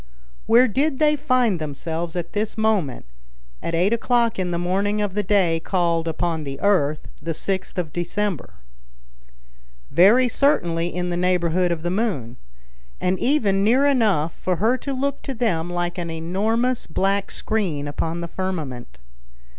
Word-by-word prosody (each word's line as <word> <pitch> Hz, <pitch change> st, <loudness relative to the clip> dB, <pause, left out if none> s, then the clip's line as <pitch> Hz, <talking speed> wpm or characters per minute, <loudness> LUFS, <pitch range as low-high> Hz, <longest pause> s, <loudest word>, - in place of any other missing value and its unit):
Where 245 Hz, +3 st, +6 dB
did 270 Hz, +6 st, 0 dB
they 300 Hz, 0 st, +3 dB
find 255 Hz, -, +1 dB
themselves 160 Hz, +3 st, -4 dB
at 175 Hz, -1 st, -4 dB
this 215 Hz, +1 st, -2 dB
moment, 210 Hz, -, 0 dB, 0.6 s
at 170 Hz, -, -2 dB
eight 185 Hz, +6 st, +2 dB
o'clock 235 Hz, -2 st, +1 dB
in 180 Hz, -1 st, -1 dB
the 170 Hz, -, -1 dB
morning 195 Hz, +4 st, 0 dB
of 205 Hz, -3 st, -1 dB
the 210 Hz, -, +1 dB
day 185 Hz, -5 st, +2 dB
called 170 Hz, -2 st, 0 dB
upon 165 Hz, 0 st, -1 dB
the 135 Hz, -1 st, -6 dB
earth 155 Hz, -7 st, +1 dB
the 165 Hz, +2 st, -3 dB
6th 190 Hz, +3 st, -3 dB
of 165 Hz, -4 st, -3 dB
December? 180 Hz, 0 st, -3 dB, 1.4 s
Very 205 Hz, -, +6 dB
certainly 175 Hz, -, +1 dB
in 180 Hz, 0 st, -3 dB
the 175 Hz, -, -1 dB
neighborhood 180 Hz, 0 st, +1 dB
of 165 Hz, -2 st, -3 dB
the 175 Hz, -, -1 dB
moon, 180 Hz, -, -2 dB, 0.6 s
and 185 Hz, +1 st, 0 dB
even 210 Hz, -8 st, +2 dB
near 250 Hz, +7 st, +4 dB
enough 210 Hz, -, +2 dB
for 185 Hz, -, -2 dB
her 220 Hz, +8 st, +2 dB
to 280 Hz, -, -4 dB
look 280 Hz, +1 st, -2 dB
to 270 Hz, -, -5 dB
them 175 Hz, -8 st, 0 dB
like 175 Hz, +1 st, -2 dB
an 170 Hz, -1 st, -4 dB
enormous 215 Hz, +10 st, -1 dB
black 195 Hz, +4 st, 0 dB
screen 180 Hz, -10 st, -2 dB
upon 165 Hz, +3 st, -3 dB
the 170 Hz, -, -4 dB
firmament. 150 Hz, -, -5 dB
185 Hz, 155 wpm, -22 LUFS, 165-220 Hz, 1.4 s, Where